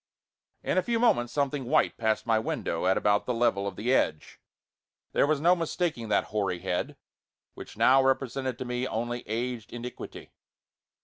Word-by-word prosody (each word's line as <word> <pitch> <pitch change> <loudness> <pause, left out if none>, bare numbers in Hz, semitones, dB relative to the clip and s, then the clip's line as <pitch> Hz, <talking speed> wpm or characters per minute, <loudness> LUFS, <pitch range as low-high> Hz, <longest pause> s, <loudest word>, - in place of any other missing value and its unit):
In 185 - +1
a - - +2
few 230 +5 -1
moments 120 - +2
something 140 -1 -1
white 120 - +2
passed 110 -2 0
my 115 -2 +3
window 110 - -2
at 95 - +3
about 105 0 +2
the 125 - 0
level 115 -4 +1
of 100 - -5
the 120 +7 0
edge. 75 -11 0 0.7
There - - +3
was 155 -1 +1
no 175 +4 +5
mistaking 165 -8 -2
that - - +3
hoary 100 -4 0
head, 90 -1 -2 0.6
which - - -11
now 135 +1 +6
represented 130 -1 0
to 130 - -5
me 125 +1 -2
only 120 +1 -3
aged 115 +1 -3
iniquity. 120 +1 -8
120 Hz, 170 wpm, -28 LUFS, 110-135 Hz, 0.7 s, now